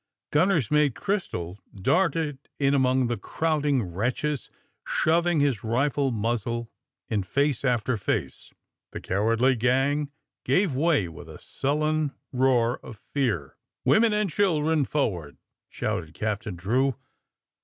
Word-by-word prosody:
Gnnner's 160 - +2
Mate 150 -4 +3
Crystal 105 - -3 0.2
darted 155 - 0
in 140 -1 +2
among 130 -1 +3
the 120 -1 -1
crowding 145 +2 0
wretches, 120 - -2 0.3
shoving 170 0 +2
his 140 -7 +1
rifle 135 +4 +1
mnzzle 115 +1 -2 0.4
in 105 - 0
face 140 +7 0
after 125 -2 +1
face. 100 - -3 0.4
The - - -4
cowardly 115 +7 +2
gang 135 +5 +1 0.3
gave 185 -5 +2
way 145 - +2
with 80 - -11
a - - -10
sullen 155 +1 -1 0.2
roar 125 -2 +2
of 110 - -11 0.2
fear. 105 - -1
*' - - -58
Women 225 0 +5
and 210 -1 +1
children 160 -6 +2
forward!" 90 - -2 0.3
shouted 80 -2 -3
Captain 105 -2 -3
Drew. 125 +9 +1
130 Hz, 120 wpm, -26 LUFS, 115-150 Hz, 0.4 s, Women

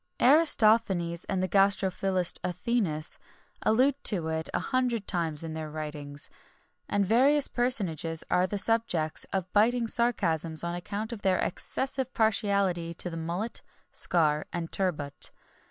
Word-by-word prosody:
Aristophanes 215 - +4
and 190 -2 -2
the - - 0
gastrophilist 190 -1 +1
Athenæus, 180 -4 -2 0.4
allude 265 +5 +2
to 170 -7 +4
it 160 0 -2
a - - -1
hundred 250 -5 -1
times 165 -4 -1
in 160 -1 -5
their 155 -1 -5
writings, 150 -2 -5 0.6
and 205 -1 +1
various 270 +7 +3
personages 175 - -1
are 180 +1 +2
the 205 - -3
subjects 195 -8 +1
of 185 -2 -3
biting 230 +3 +3
sarcasms 170 -10 0
on 170 0 -3
account 205 +6 -5
of 215 - -8
their 190 -2 +2
excessive 265 +6 -3
partiality 200 -6 0
to 175 - -4
the - - -6
mullet, 170 +8 -4 0.3
scar, 155 -3 0
and 170 -1 -4
turbot. 155 -7 +2
185 Hz, 135 wpm, -28 LUFS, 165-225 Hz, 0.6 s, Aristophanes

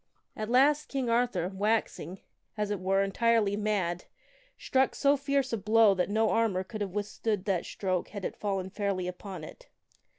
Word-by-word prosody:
At 215 0 -4
last 285 +5 +4
King 260 -4 -1
Arthur, 230 -7 +1
waxing, 200 -2 -1 0.4
as 210 -1 -1
it 205 - -1
were, 195 +2 +2
entirely 210 +1 +2
mad, 200 -5 -1 0.5
struck 265 0 +1
so 280 0 +3
fierce 275 -2 -1
a - - +1
blow 215 +1 +5
that 185 0 -1
no 220 +1 +2
armor 215 -5 +1
could 215 +3 -7
have 195 -2 -3
withstood 210 -1 -2
that 190 -5 0
stroke 185 -3 -2
had 200 -3 -7
it - - -3
fallen 195 -2 -3
fairly 200 -3 -2
upon 180 -1 -7
it. - - -12
205 Hz, 170 wpm, -29 LUFS, 190-230 Hz, 0.5 s, blow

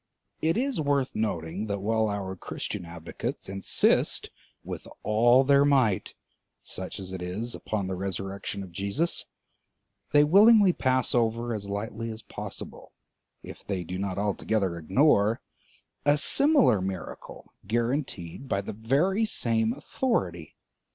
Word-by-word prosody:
It 165 +4 +2
is 260 - 0
worth 140 -3 +1
noting 95 -1 -2
that 100 -1 -1
while 110 +2 +1
our 100 -2 -3
Christian 90 - -5
advocates 85 -1 -6
insist 95 0 +1 0.3
with - - -7 0.2
all 120 +4 +5
their 140 +1 +5
might, 130 -9 +2 0.4
such 95 +2 -6
as 95 -1 -7
it 95 -1 -5
is, 100 +7 -4
upon 105 -3 -3
the 95 - -3
resurrection 95 +1 -4
of 95 - -11
Jesus, 100 - -1 0.8
they 145 0 +6
willingly 200 +4 +7
pass 130 -3 +1
over 115 0 +1
as 100 -2 -5
lightly 110 +3 -4
as 110 0 -7
possible, - - -8 0.5
if - - -10
they 95 -3 -3
do 90 +2 -5
not 100 -1 -3
altogether 100 -2 0
ignore, 105 - +3 0.6
a 145 +1 +4
similar 270 - +4
miracle 95 -2 -7
guaranteed 120 - -2
by 100 - +1
the 100 - -6
very 140 - +1
same 115 - +1
authority. 95 - -2
110 Hz, 130 wpm, -27 LUFS, 95-140 Hz, 0.8 s, willingly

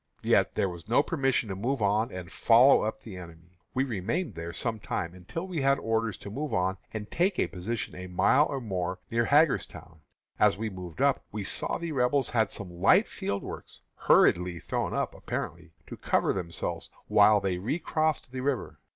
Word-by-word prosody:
"Yet - - +3
there - - +1
was 90 +2 -9
no 125 +5 +4
permission 135 -8 0
to 95 - -3
move 125 +8 -1
on 105 +2 +1
and 90 -2 -8
follow 120 +4 +6
up 110 - -3
the 100 -5 -9
enemy. 85 0 -13 0.2
We 130 - +2
remained 120 - -2
there 85 0 -6
some 110 +5 -3
time, 85 -4 -3
until 90 - -6
we 180 -6 -3
had 135 +1 +3
orders 115 -1 -1
to 100 - -8
move 145 +6 -3
on 95 +1 0
and 105 -1 -6
take 185 +3 +1
a - - +2
position 105 +4 -4
a 90 0 -7
mile 130 +11 +3
or 140 - -2
more 95 -6 -3
nearer 115 0 +1
Hagerstown. 140 - +1 0.4
As - - +4
we 110 0 -3
moved 90 -3 -8
up 140 -1 +2
we 105 -1 -4
saw - - 0
that - - -2
the 170 -1 -3
Rebels 135 -1 +1
had 110 -4 +2
some 90 -3 -8
light - - +5
field 100 0 -4
works - - -9
hurriedly 90 0 +3
thrown 85 - -3
up, - - -1
apparently 85 -1 -5
to - - -8
cover - - +1
themselves 85 -4 -4 0.2
while 105 -1 +6
they 95 -2 -2
recrossed 155 - -1
the 130 0 -4
river. 135 -1 -2
110 Hz, 195 wpm, -28 LUFS, 90-135 Hz, 0.4 s, follow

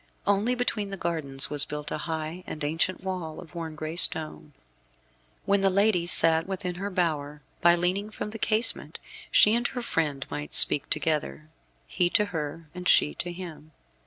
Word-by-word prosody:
Only 205 +5 +1
between 225 -4 -2
the 195 - -6
gardens 150 -7 -2
was 145 -1 +6
built 150 0 -5
a - - -3
high 160 +3 -4
and 155 - -6
ancient 165 +5 -1
wall, 180 -5 -5
of 170 - -13
worn 165 -2 -6
gray 155 +1 -6
stone. 155 -3 +3 0.9
When 200 0 +2
the 195 - +3
lady 195 -2 +1
sat 165 -1 +4
within 185 -2 -4
her 200 - -3
bower, 150 -6 -2 0.2
by 175 0 +5
leaning 185 +4 -1
from 210 0 -7
the 225 - -5
casement 220 +2 +2 0.3
she 210 - +5
and 240 +1 +1
her 245 -2 -6
friend 145 - -2
might 75 0 -6
speak 145 - +5
together, 155 -1 -2 0.4
he 175 -1 0
to 210 - +1
her, 160 +1 -5
and 180 0 -6
she 150 - +4
to 175 - -5
him. 165 -4 -10
170 Hz, 175 wpm, -26 LUFS, 155-195 Hz, 0.9 s, was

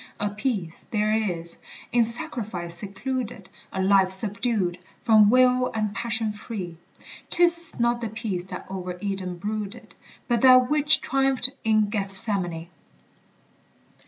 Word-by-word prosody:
A 205 0 0
peace 205 -6 -4
there 215 -1 0
is, 175 -6 -2 0.3
in 240 0 +4
sacrifice 220 - -4
secluded, 210 +4 -5 0.2
A 190 - -2
life 190 -1 +4
subdued, 195 -2 +2 0.2
from 215 -3 +6
will 250 +1 +4
and 215 -2 -1
passion 225 -1 -2
free; 200 -5 -7 0.5
'Tis 340 -3 +4
not 235 0 +1
the 230 - -3
peace 210 -5 -4
that - - -8
over 185 -1 -6
Eden 190 -2 -4
brooded, 210 +3 -6 0.3
But 240 -2 +1
that 255 0 +6
which 300 +1 +4
triumphed 270 -2 +2
in 215 -2 +2
Gethsemane. 195 -5 -3
215 Hz, 125 wpm, -24 LUFS, 190-240 Hz, 0.5 s, from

